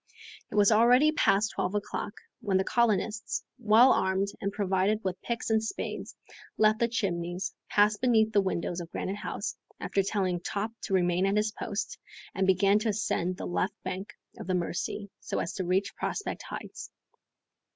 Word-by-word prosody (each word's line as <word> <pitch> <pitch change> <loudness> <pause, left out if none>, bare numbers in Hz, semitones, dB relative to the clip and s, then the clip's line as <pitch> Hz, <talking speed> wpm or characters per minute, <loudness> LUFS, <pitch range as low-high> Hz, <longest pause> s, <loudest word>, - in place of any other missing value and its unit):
It - - -7
was 205 +1 +5
already 245 +7 +6
past 215 -8 +2
twelve 185 - -2
o'clock, 205 0 -3 0.3
when 205 -6 +1
the 190 - +2
colonists, 215 -1 0 0.2
well 235 +3 +6
armed 190 +1 +1
and 200 - -1
provided 200 +1 +1
with 185 -1 -3
picks 235 -1 -3
and 220 0 +3
spades, 220 - -5 0.4
left 215 0 +4
the 235 - +3
Chimneys, 180 -5 -2 0.2
passed 210 0 +3
beneath 220 -3 +4
the 200 - +5
windows 175 -2 -2
of 170 - -8
Granite 195 +3 -3
House, - - -4 0.2
after 200 - 0
telling 190 -3 0
Top 205 +5 -3
to 195 - 0
remain 180 +1 +2
at 200 +1 +1
his 215 0 +1
post, 205 -1 -4 0.3
and 190 0 0
began 195 +2 +4
to 220 +1 -1
ascend 185 -3 -1
the - - -5
left 190 +3 -1
bank 190 +5 -5 0.2
of - - -7
the 185 - +1
Mercy, 180 +3 -3
so - - -4
as 170 - -2
to 190 - -3
reach 190 +3 0
Prospect 410 - -3
Heights. - - -7
200 Hz, 170 wpm, -29 LUFS, 185-215 Hz, 0.4 s, already